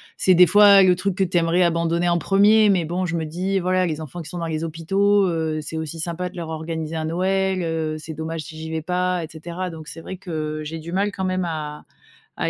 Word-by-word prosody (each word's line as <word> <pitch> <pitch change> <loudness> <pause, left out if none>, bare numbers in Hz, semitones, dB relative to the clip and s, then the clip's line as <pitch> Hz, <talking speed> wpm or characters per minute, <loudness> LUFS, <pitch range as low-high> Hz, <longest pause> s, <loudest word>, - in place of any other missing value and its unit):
c'est 185 - +3
des 180 +1 +7
fois 205 +1 +7
le 180 -1 +5
truc 195 +1 -1
que 195 - +1
tu 175 -1 -1
aimerais 170 +2 +2
abandonner 170 0 +1
en 175 0 +2
1er. 205 +4 +4
Mais 180 -4 +2
bon, 180 +3 -2
je 170 -1 -2
me 160 - -2
dis: 185 +5 -1
«Voilà, 185 0 +1
les 160 -2 -3
enfants 160 +3 -7
qui 150 - -10
sont 175 - -7
dans 170 - -3
les 160 0 -3
hôpitaux, 195 +5 +2
heu, 160 -2 -1
c'est 155 - -7
aussi 160 +1 -5
sympa 175 +2 -3
de 180 - -14
leur 170 - -5
organiser 160 0 -4
un 160 - -2
Noël. 190 +2 0
Heu, 160 -1 -2
c'est 160 +1 -8
dommage 160 +1 -4
si 155 +3 -10
j'y 160 0 -6
vais 160 0 -2
pas» 180 +1 -1
et - - -11
cetera. 170 +3 -6
Donc 160 -2 -9
c'est 165 - -9
vrai 190 - -7
que 155 -4 -4
j'ai 160 +2 -6
du 170 +3 -8
mal 200 +2 +1
quand 190 -1 -4
même 185 0 -1
à 150 -2 -5 0.5
à - - 0
170 Hz, 255 wpm, -22 LUFS, 160-185 Hz, 0.5 s, des